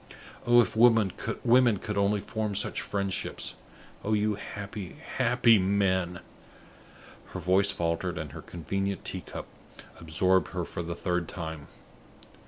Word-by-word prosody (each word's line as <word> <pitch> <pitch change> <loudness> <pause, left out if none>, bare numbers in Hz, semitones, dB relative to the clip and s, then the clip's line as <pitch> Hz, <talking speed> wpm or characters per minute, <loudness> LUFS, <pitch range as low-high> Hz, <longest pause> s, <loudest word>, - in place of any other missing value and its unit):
Oh, 120 0 +7
if 115 - -2
women 115 -4 +5
could 115 -3 +1
only 100 0 +2
form 110 -1 -3
such 100 - 0
friendships! 100 -1 -2 0.5
Oh 110 - 0
you 105 0 +2
happy, 100 -1 -7 0.2
happy 120 -3 +5
men!" 95 -2 +1 1.1
Her - - -6
voice 95 +2 +3
faltered, 85 0 -1
and 75 -2 -5
her - - -8
convenient 95 +3 -3
tea - - -3
cup - - -8 0.5
absorbed 90 +4 +1
her 90 -2 -2
for 85 - -5
the 85 0 -4
third 90 -1 -1
time. 80 -4 -6
100 Hz, 130 wpm, -28 LUFS, 90-105 Hz, 1.1 s, Oh